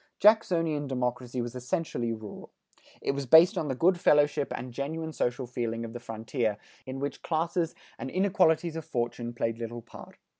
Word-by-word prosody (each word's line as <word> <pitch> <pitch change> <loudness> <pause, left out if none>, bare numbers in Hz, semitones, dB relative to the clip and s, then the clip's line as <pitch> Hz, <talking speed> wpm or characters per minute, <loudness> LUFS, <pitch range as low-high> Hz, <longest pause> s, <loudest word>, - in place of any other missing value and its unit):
Jacksonian 165 -9 +4
democracy 125 -1 -2
was 120 0 -5
essentially 125 -2 -2
rural. 110 -2 -7 0.5
It - - +1
was 140 -1 -4
based 165 - +8
on 155 - -1
the 135 - -1
good 175 +6 +3
fellowship 145 -2 +3
and 125 0 -6
genuine 160 +5 -3
social 125 -1 -1
feeling 115 -1 -3
of 115 - -8
the 120 - -5
frontier, 115 -1 -2 0.3
in 130 +1 -5
which 140 +1 -4
classes 165 +1 -1 0.2
and 135 - -4
inequalities 175 -2 +2
of 160 - -4
fortune 120 -2 -2
played 115 -1 -2
little 115 0 -5
part. 115 - -13
135 Hz, 165 wpm, -29 LUFS, 120-160 Hz, 0.5 s, based